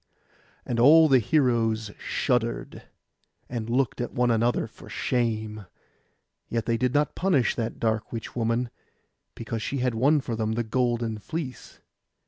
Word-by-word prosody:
And 120 -1 -2
all 155 +6 +8
the 135 -3 +5
heroes 115 -4 +1
shuddered, 120 -3 -1 0.7
and 115 -2 -4
looked 125 0 0
one 120 0 0
at 115 - +2
the 115 - +2
other 120 - 0
for - - -14
shame; 110 -4 -2 0.8
yet 115 -1 -1
they 115 - +1
did 125 +2 0
not 145 0 +2
punish 175 -10 +2
that 115 -1 -4
dark 110 -1 -1
witch 115 -2 -6
woman, 115 +1 0 0.6
because 115 -1 -4
she 140 - -3
had 125 -1 0
won 140 +7 +3
for 120 -4 -4
them 110 0 -1
the 120 +1 -1
golden 120 -1 -1
fleece. 145 +2 -7
120 Hz, 150 wpm, -26 LUFS, 115-125 Hz, 0.8 s, all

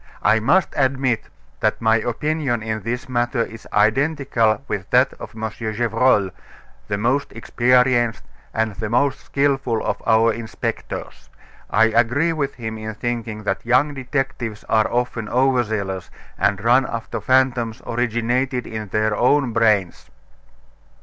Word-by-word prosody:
I 105 +2 +4
must 155 +11 +3
admit 130 -4 +1 0.3
that - - +1
my 110 0 +3
opinion 120 +1 -1
in 110 -1 -3
this 120 +5 -4
matter 120 -1 0
is 115 0 -10
identical 115 0 +2
with 95 -1 -4
that 125 +2 +4
of - - -9
M. 110 0 -3
Gevrol, 110 -2 +1 0.6
the 100 - -1
most 125 +7 0
experienced 120 0 +2 0.3
and 110 -1 -1
the 110 - -3
most 130 +4 +1
skilful 135 -5 0
of - - -2
our 115 0 +4
inspectors. 115 -1 -6 0.4
I 110 - +4
agree 120 +9 +2
with 140 -3 -2
him 110 -2 -6
in 110 0 -6
thinking 115 -2 -4
that 95 -1 -2
young 130 +5 +2
detectives 130 -5 -3
are 110 -1 +1
often 120 -3 -2
overzealous, 110 - 0 0.3
and 100 +1 0
run 125 +3 +4
after 115 -1 -5
fantoms 125 -2 +1
originated 120 +2 -1
in 110 -1 -6
their 105 +2 0
own 125 +1 +2
brains." 105 -6 +1
115 Hz, 135 wpm, -21 LUFS, 110-130 Hz, 0.6 s, I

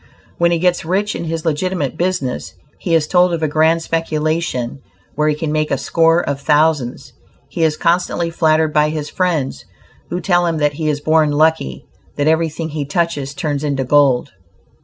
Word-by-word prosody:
When 170 0 +4
he 170 - +1
gets 175 +1 +1
rich 195 +5 -1
in - - -4
his 165 0 -4
legitimate 160 -2 -1
business, 175 -7 -2 0.2
he 170 -3 0
is 160 -2 +2
told 180 0 +3
of 160 - -5
a - - +2
grand 160 +2 +2
speculation 155 -6 -2 0.3
where 150 +1 0
he 150 - +1
can 150 0 -3
make 155 0 0
a - - 0
score 165 +1 +2
of 140 -1 -2
thousands. 150 -4 +1 0.4
He - - -4
is 155 -1 +2
constantly 170 0 0
flattered 160 -2 +2
by 150 0 +3
his 150 -1 -4
friends, 170 -7 -1 0.5
who 175 - -2
tell 175 -2 +2
him 165 -1 -1
that 150 -1 +1
he 155 +1 -2
is 145 -1 -1
born 155 0 +3
lucky, 145 - +1 0.3
that 145 - 0
everything 160 0 0
he 150 -1 -3
touches 145 -2 -2
turns 145 -1 -2
into 140 -2 -1
gold. 135 -2 +3
155 Hz, 180 wpm, -18 LUFS, 150-170 Hz, 0.5 s, When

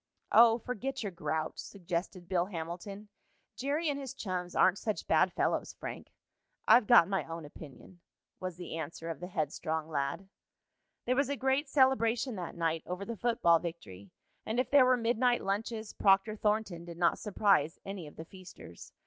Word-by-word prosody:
"Oh, 230 -1 +7
forget 250 +2 -4
your 200 - -3
grouch," 160 -2 -3
suggested 180 -1 -5
Bill 180 -1 +1
Hamilton. 190 +4 -7 0.5
"Jerry 290 +5 -1
and 285 -1 -1
his 270 -3 -7
chums 180 -3 -4
aren't 190 +1 +4
such 215 -2 -3
bad - - +3
fellows, - - -1
Frank." - - -8 0.6
"I've 235 -3 +6
got 240 -9 +7
my 195 -1 -1
own 165 -1 -7
opinion," 150 +4 -13 0.4
was 185 -2 -5
the 170 -2 -6
answer 165 +2 -5
of 160 - -7
the 180 - -6
headstrong 160 -1 -3
lad. 140 +5 -2 0.8
There 255 - +1
was 280 0 +1
a 285 - 0
great 270 +2 0
celebration 260 -3 +2
that 175 -2 -6
night 165 -1 0
over 185 +2 -4
the 230 - -5
football 215 -7 +3
victory, 100 - -8 0.3
and 225 +3 -2
if 255 -1 -1
there 280 -2 +7
were 255 0 +4
midnight 240 +1 +1
lunches, 220 +2 -3
Proctor 195 +2 +3
Thornton 210 -5 -1
did 170 -1 -9
not 170 -1 +2
surprise 195 -7 +2
any 195 -5 -6
of 150 - -13
the 160 - -8
feasters. 185 - -13
195 Hz, 170 wpm, -31 LUFS, 170-235 Hz, 0.8 s, Oh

